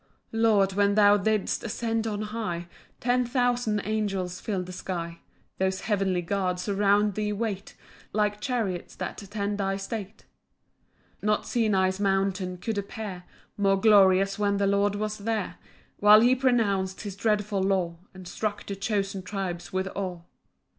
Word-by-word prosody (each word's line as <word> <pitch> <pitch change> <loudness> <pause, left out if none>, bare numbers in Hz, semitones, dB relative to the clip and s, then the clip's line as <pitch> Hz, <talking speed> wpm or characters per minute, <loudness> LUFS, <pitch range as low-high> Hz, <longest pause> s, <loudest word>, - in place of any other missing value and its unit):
1 225 - -2
Lord, 200 -4 +4
when 200 +1 +2
thou 205 -1 +6
didst 210 +1 0
ascend 225 0 -1
on 210 -1 -2
high, 210 -6 -4 0.3
Ten 250 +1 +2
thousand 245 -3 +1
angels 195 -4 -2
fill'd 190 -4 -2
the 185 - -8
sky; 170 -2 -5 0.4
Those 190 0 0
heavenly 195 -4 0
guards 180 0 -1
around 205 +1 +3
thee 210 +1 -1
wait, 205 -2 -3 0.4
Like 210 0 0
chariots 215 -8 -2
that - - -5
attend 205 0 -3
thy 195 0 0
state. 200 0 -6 0.9
2 - - -4
Not 210 0 +1
Sinai's 195 -5 +1
mountain 195 -2 0
could 210 +3 -2
appear 200 -3 -6 0.3
More 195 -1 +3
glorious 195 -2 +5
when 200 -1 +2
the 200 - +1
Lord 200 +1 +2
was 215 +1 -3
there; 220 +1 -2 0.4
While 210 +1 +8
he 245 +2 +5
pronounc'd 220 -8 +1
his 205 -3 -6
dreadful 210 -1 0
law, 185 -3 0
And 185 -1 -11
struck 210 +2 -3
the 200 - -4
chosen 200 -2 -2
tribes 185 -2 -4
with 190 0 -1
awe. 185 -3 -4
200 Hz, 150 wpm, -27 LUFS, 190-215 Hz, 0.9 s, While